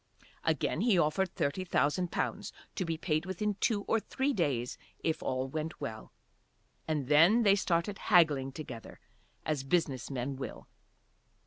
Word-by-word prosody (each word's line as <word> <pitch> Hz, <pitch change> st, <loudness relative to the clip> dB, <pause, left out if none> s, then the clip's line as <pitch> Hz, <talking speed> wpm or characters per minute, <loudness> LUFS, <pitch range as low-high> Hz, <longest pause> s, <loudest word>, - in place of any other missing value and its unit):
Again -, -, 0 dB
he 225 Hz, -6 st, +4 dB
offered 175 Hz, +3 st, +1 dB
thirty 145 Hz, +7 st, -1 dB
thousand 175 Hz, 0 st, +1 dB
pounds, -, -, -2 dB, 0.2 s
to 185 Hz, -, -2 dB
be 165 Hz, -1 st, -2 dB
paid 155 Hz, +1 st, -1 dB
within 205 Hz, +3 st, -1 dB
two 205 Hz, -3 st, +1 dB
or 225 Hz, -, +1 dB
three 270 Hz, +5 st, -1 dB
days 135 Hz, -, -1 dB, 0.2 s
if 160 Hz, -, 0 dB
all 130 Hz, 0 st, -1 dB
went 155 Hz, +4 st, -4 dB
well. 110 Hz, -6 st, -6 dB, 0.8 s
And 150 Hz, -5 st, -1 dB
then 170 Hz, -, +6 dB
they 200 Hz, -2 st, +6 dB
started 190 Hz, +1 st, 0 dB
haggling 150 Hz, -8 st, +5 dB
together 130 Hz, -6 st, -8 dB, 0.5 s
as 150 Hz, -3 st, -1 dB
business 135 Hz, -4 st, 0 dB
men 135 Hz, 0 st, -3 dB
will. 130 Hz, -4 st, -7 dB
160 Hz, 145 wpm, -31 LUFS, 135-185 Hz, 0.8 s, then